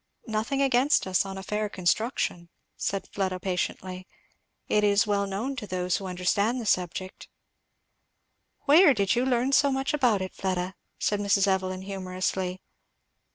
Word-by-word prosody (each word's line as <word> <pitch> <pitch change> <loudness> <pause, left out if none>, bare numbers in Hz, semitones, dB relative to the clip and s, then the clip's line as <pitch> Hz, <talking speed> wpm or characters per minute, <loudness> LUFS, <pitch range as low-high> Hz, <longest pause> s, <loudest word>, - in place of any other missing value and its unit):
"Nothing 230 +5 -1
against 270 +2 +3
us, 190 +1 +1
on 195 0 -6
a 190 - -7
fair 210 +1 -2
construction," 185 -2 -1 0.3
said 195 -1 -3
Fleda 185 -2 -1
patiently. 185 0 -3 0.6
"It 210 - +2
is 205 0 +4
well 200 -1 0
known 220 +8 -3
to 215 -4 -5
those 180 -1 -1
who 195 - -6
understand 200 +6 0
the 235 - -5
subject" 185 -1 -2 1.4
"Where 295 0 +7
did 200 -2 +2
you 245 - +2
learn 250 +1 +1
so 280 0 +4
much 270 +2 -1
about 240 -9 +2
it, 185 - -6
Fleda?" 185 -1 -2 0.2
said 205 - 0
Mrs. 200 -1 +3
Evelyn 190 -1 -1
humourously. 185 -1 -3
200 Hz, 150 wpm, -27 LUFS, 185-230 Hz, 1.4 s, Where